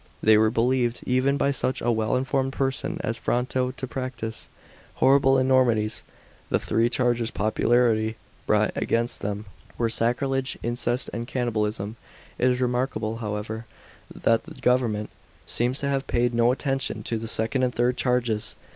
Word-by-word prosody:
They 110 0 +6
were 110 +1 +4
believed, 120 +1 +1
even 130 +2 +2
by 140 - +2
such 130 -1 -1
a 120 - +1
well 110 +1 0
informed 135 +1 0
person 135 -1 -1
as 115 +1 -2
Fronto, 125 +1 0
to 130 +1 -6
p»actise 125 -4 -5 0.5
horrible 135 0 +4
enormities. 125 -5 +2 0.5
The - - +3
three 115 +2 +1
charges 120 -2 +1
popularly 110 +1 +2 0.3
brought - - +2
ayainst 120 +1 -1
them 105 +1 -4 0.3
were 115 -1 0
sacrilege, 130 +4 0
incest, 120 +2 0
and 115 0 -4
cannibalism. 110 -4 -2 0.4
It 125 - +4
is 125 0 0
remarkable, 120 -3 -1
however, 110 +1 -4 0.4
that 115 0 +1
the - - -12
government 120 -4 +1 0.3
seems 125 +3 0
to 140 - -1
have 135 -1 -1
paid 120 0 +1
no 120 +1 +4
attention 135 0 -2
to 115 - -2
the 115 - -5
second 115 +4 0
and 125 -1 0
third 120 +1 +2
charges. 120 -5 0
120 Hz, 150 wpm, -25 LUFS, 110-130 Hz, 0.5 s, They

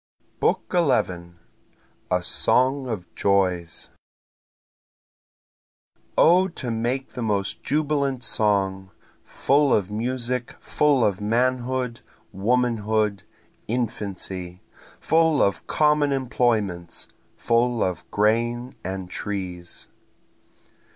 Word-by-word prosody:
BOOK - - +2
XI 95 - +1 0.8
A 90 -1 +1
Song 130 +8 +2
of 105 -7 -5
Joys 90 -4 0 2.3
O 180 +3 +6
to 130 -9 -5
make 120 +4 -2
the 125 - -7
most 100 -3 -1
jubilant 140 -3 0
song! 95 -4 +1 0.3
Full 140 0 +2
of 100 -1 +1
music 120 +2 -2
full 145 -5 +2
of 100 -1 0
manhood, 125 +2 0 0.3
womanhood, 110 -2 0 0.5
infancy! 100 -6 -4 0.4
Full 160 -2 +3
of 100 - +1
common 150 -1 +3
employments 110 -9 -1 0.3
full 120 0 +1
of 90 -3 -3
grain 120 +4 0
and 95 -1 -4
trees. 90 -2 -5
115 Hz, 85 wpm, -24 LUFS, 100-130 Hz, 2.3 s, O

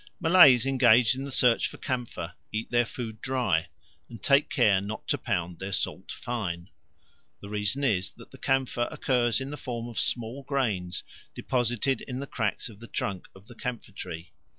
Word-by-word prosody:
Malays 160 -8 +7
engaged 125 -3 +5
in 135 +1 -4
the 140 - -6
search 125 -3 +3
for - - -10
camphor 120 -9 -4 0.2
eat 110 +1 -3
their 120 -1 +3
food 110 -3 -6
dry 110 - +1 0.4
and 115 -4 -11
take 140 +1 +4
care 105 -9 +4
not 105 +2 -6
to - - +2
pound 85 0 -2
their 95 +1 -4
salt - - -2
fine. 95 -7 -4 0.7
The 100 - -10
reason 105 +6 0
is 100 -8 +2
that - - -15
the - - -13
camphor 130 -2 +1
occurs 125 -7 +1
in 135 +1 -5
the 150 - -5
form 120 -4 -5
of 120 - -4
small 120 +3 -2
grains 110 - -1 0.3
deposited 120 +1 0
in 125 -2 -5
the 140 - -4
cracks 110 -6 -2
of 105 -4 -12
the 115 - -10
trunk 95 -2 -3
of 95 +1 -15
the 120 - -13
camphor 120 -3 -5
tree. 90 -3 -7
120 Hz, 180 wpm, -28 LUFS, 100-130 Hz, 0.7 s, Malays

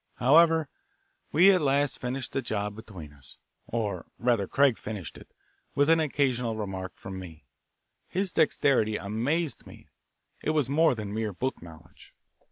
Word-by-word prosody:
However, 160 +4 +5 0.6
we 180 +6 +7
at 185 -3 +3
last 140 0 +1
finished 125 0 -4
the 135 - -1
job 105 -3 -3
between 95 -9 -10
us; 70 -3 -13 0.3
or 105 -6 -3
rather 120 -5 +1
Craig 140 -4 +3
finished 105 -6 -6
it, - - -13 0.5
with 145 +3 +4
an 165 - +5
occasional 130 -6 0
remark 95 -3 -5
from 95 -1 -8
me. 80 -4 -11 0.6
His 190 -1 -2
dexterity 135 -8 +2
amazed 135 +11 -2
me; - - -15 0.5
it - - -2
was 145 -5 +2
more 155 -1 +4
than 105 -2 -5
mere 110 -1 -2
book 130 +8 -3
knowledge. 80 -2 -15
120 Hz, 150 wpm, -28 LUFS, 100-145 Hz, 0.6 s, we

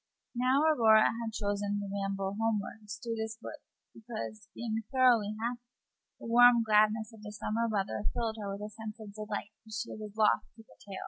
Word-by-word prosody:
Now, 255 +4 +3
Aurora 225 -9 +6
had 230 0 -1
chosen 205 -1 -1
to 200 - -4
ramble 195 0 -2
homeward 215 -1 -2
through 230 +2 -4
this 220 0 -4
wood - - -8 0.3
because, 115 - -7
being 225 -1 -2
thoroughly 240 -6 +4
happy, 240 +1 -2 0.6
the - - -10
warm 240 0 +7
gladness 215 0 +3
of 220 - -14
the 210 -1 -8
summer 215 +2 -1
weather 205 0 -2
filled 225 -2 -2
her 200 -2 -4
with 200 +1 -6
a - - -6
sense 220 0 -8
of 210 -2 -9
delight 210 0 -5
which 220 -1 -9
she 210 - -4
was 215 -1 -8
loath 215 -1 +4
to 225 - -14
curtail. 200 -3 -10
220 Hz, 185 wpm, -31 LUFS, 210-230 Hz, 0.6 s, warm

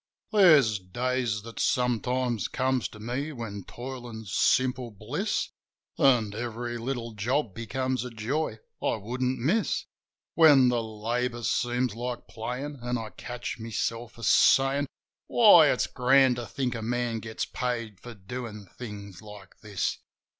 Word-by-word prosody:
There's 155 - +6
days 120 +3 -2
that 115 0 -9
sometimes 125 -2 +1
come 130 0 0
to 110 - -6
me 125 +7 -3
when 105 -7 -6
toilin's 120 -5 -7
simple 130 -1 +2
bliss, 120 - -2 0.5
An' 120 -6 +4
every 120 +1 -4
little 120 -1 -3
job 115 +2 -1
becomes 130 +4 -2
ia 125 - -5
joy 115 +3 -2 0.2
I - - +1
wouldn't 125 +4 -2
miss: 175 - 0 0.5
When 145 -6 +7
the 120 -1 +1
labour 115 +2 -3
seems 120 0 0
like 120 +2 -5
playin', 130 +5 -5
an' 120 +1 -1
I 110 -2 -6
catch 120 -1 -6
myself 115 +1 -3
a 115 - -10
sayin', 135 +4 +4 0.4
"Why, - - +8
it's - - +2
grand 130 0 +4
to 120 -2 -5
think 130 +2 -2
a 115 - -5
man 120 0 -1
gets 110 0 -4
paid 115 -5 -3
for 120 -1 -10
doin' 105 +1 -7
things 100 -4 -9
like 105 -2 -13
this!" 105 -4 -2
120 Hz, 140 wpm, -27 LUFS, 110-130 Hz, 0.5 s, Why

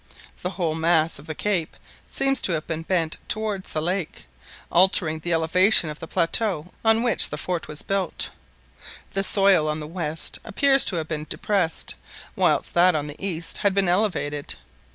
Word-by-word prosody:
The 180 - -2
whole 175 -4 -2
mass 160 -1 +1
of 140 - -14
the 155 - -4
cape 185 -5 -2 0.3
seemed 270 0 +3
to 180 - +1
have 155 -1 -2
been 165 -1 -4
bent 165 -2 -1
towards 215 -3 -3
the 155 - -2
lake, 180 -1 -3 0.5
altering 175 -3 +4
the 175 +2 -4
elevation 165 +1 +3
of 150 - -10
the 165 - -8
plateau 175 -1 -1
on 225 +1 +3
which 235 -4 +4
the 150 - -5
fort 175 +2 -3
was 150 -1 -3
built. 195 -3 -1 0.8
The 195 - 0
soil 195 -5 +4
on 150 0 -2
the 150 - -6
west 160 -1 -3
appeared 275 +5 +3
to - - +3
have 160 -2 -3
been 155 -1 -4
depressed, 190 -6 -1 0.4
whilst - - +1
that 175 0 +4
on 150 -1 -1
the 150 +5 -9
east 170 -4 -2
had 200 -2 +1
been 200 -2 +3
elevated. 175 -7 -1
175 Hz, 175 wpm, -23 LUFS, 155-195 Hz, 0.8 s, altering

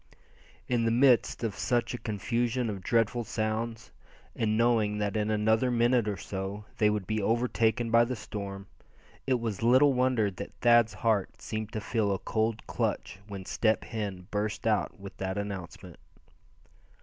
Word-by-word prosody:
In 120 -2 +1
the - - +3
midst 125 0 +3
of 110 -3 -1
such 120 +3 0
a 120 - -4
confusion 120 +2 -1
of 100 -2 -6
dreadful 115 +3 +1
sounds, 110 0 -3 0.4
and 110 -1 0
knowing 115 -3 +2
that 105 -1 -1
in 105 0 0
another 110 +3 +2
minute 120 -1 +2
or 100 -2 -2
so 95 +3 -5
they 105 -2 +5
would 105 -2 -1
be 110 +2 -1
overtaken 115 +1 +1
by 115 +1 +6
the 125 +1 -3
storm, 100 -3 -6 0.6
it 130 -2 +2
was 110 -4 -3
little 130 +5 +5
wonder 125 -5 +2
that 100 +2 -8
Thad's 120 -2 +4
heart 110 0 0
seemed 110 -1 -5
to 110 - -3
feel 110 -2 0
a 95 - +1
cold 110 +3 -1
clutch - - -2
when 100 -2 -7
Step 110 +2 +1
Hen 100 -5 -5
burst 105 +1 -2
out 110 -2 0
with 100 0 -9
that 95 +1 -3
announcement. 95 -3 -6
110 Hz, 160 wpm, -29 LUFS, 105-120 Hz, 0.6 s, by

